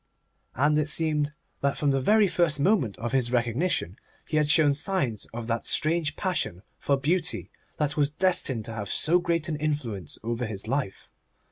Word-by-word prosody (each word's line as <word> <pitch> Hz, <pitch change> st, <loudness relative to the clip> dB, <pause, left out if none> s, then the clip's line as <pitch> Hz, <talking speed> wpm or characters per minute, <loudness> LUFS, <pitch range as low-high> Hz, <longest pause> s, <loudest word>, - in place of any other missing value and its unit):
And 150 Hz, +4 st, +3 dB
it 150 Hz, -, 0 dB
seems 155 Hz, -2 st, +1 dB, 0.3 s
that 140 Hz, 0 st, 0 dB
from 145 Hz, -2 st, +1 dB
the 135 Hz, -1 st, +1 dB
very 210 Hz, +8 st, +4 dB
first 170 Hz, -5 st, +1 dB
moment 140 Hz, -, +2 dB
of 120 Hz, +2 st, -4 dB
his 130 Hz, -3 st, +1 dB
recognition 120 Hz, -, 0 dB, 0.3 s
he 155 Hz, -, -1 dB
had 150 Hz, -1 st, +2 dB
shown 150 Hz, -1 st, +4 dB
signs 140 Hz, -, -1 dB
of 115 Hz, 0 st, -6 dB
that 115 Hz, 0 st, -2 dB
strange 155 Hz, -1 st, +1 dB
passion 140 Hz, -, -2 dB, 0.2 s
for 140 Hz, -, +1 dB
beauty 165 Hz, +5 st, -1 dB, 0.3 s
that 150 Hz, -1 st, -1 dB
was 145 Hz, -1 st, +3 dB
destined 150 Hz, -, 0 dB
to 115 Hz, -, -4 dB
have 105 Hz, -3 st, -5 dB
so 170 Hz, +4 st, +4 dB
great 170 Hz, -2 st, -1 dB
an 155 Hz, -3 st, -2 dB
influence 145 Hz, -, -3 dB
over 120 Hz, +1 st, -2 dB
his 105 Hz, -1 st, -6 dB
life. 130 Hz, -6 st, -3 dB
145 Hz, 175 wpm, -26 LUFS, 120-160 Hz, 0.3 s, very